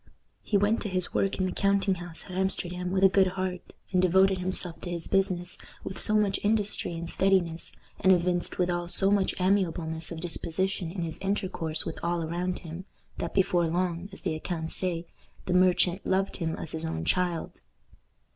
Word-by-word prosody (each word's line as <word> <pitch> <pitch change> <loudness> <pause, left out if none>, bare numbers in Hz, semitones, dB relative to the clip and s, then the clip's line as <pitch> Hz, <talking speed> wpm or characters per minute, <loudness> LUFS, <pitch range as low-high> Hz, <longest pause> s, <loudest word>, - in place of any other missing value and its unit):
He 205 - +1
went 205 +3 +2
to 210 - -3
his 185 -1 -2
work 195 - 0
in 185 - 0
the 185 - -1
counting 195 -1 +2
house 175 -2 -7
at - - -11
Amsterdam 180 -1 -1
with 190 +1 0
a - - +10
good 190 0 +4
heart, 185 -1 -4 0.2
and 185 -1 +3
devoted 190 +1 +4
himself 180 -2 +2
to 175 - -4
his 170 -2 -4
business 185 -2 0 0.2
with 190 - -6
so 215 - +6
much 205 -2 +2
industry 210 -4 +1
and 170 0 -5
steadiness, 175 -3 +1 0.3
and 190 - +4
evinced 175 -1 +2
withal 175 -1 0
so 195 +3 +5
much 200 -2 +1
amiableness 175 -4 0
of 165 - -5
disposition 175 +1 -1
in 175 -1 -4
his 165 -1 -5
intercourse 190 -5 -1
with - - -5
all 170 0 -1
around 175 +3 -2
him, 170 +2 -8 0.3
that - - -4
before 180 -3 +2
long, 175 +2 -2
as 195 - -8
the 175 - -1
accounts 160 0 -4
say, 175 -2 -1 0.4
the 180 - -1
merchant 180 0 +3
"loved 190 +1 0
him 165 -3 -2
as 160 - -3
his 160 0 -4
own 80 - -3
child." 175 - -1
180 Hz, 185 wpm, -28 LUFS, 170-190 Hz, 0.4 s, a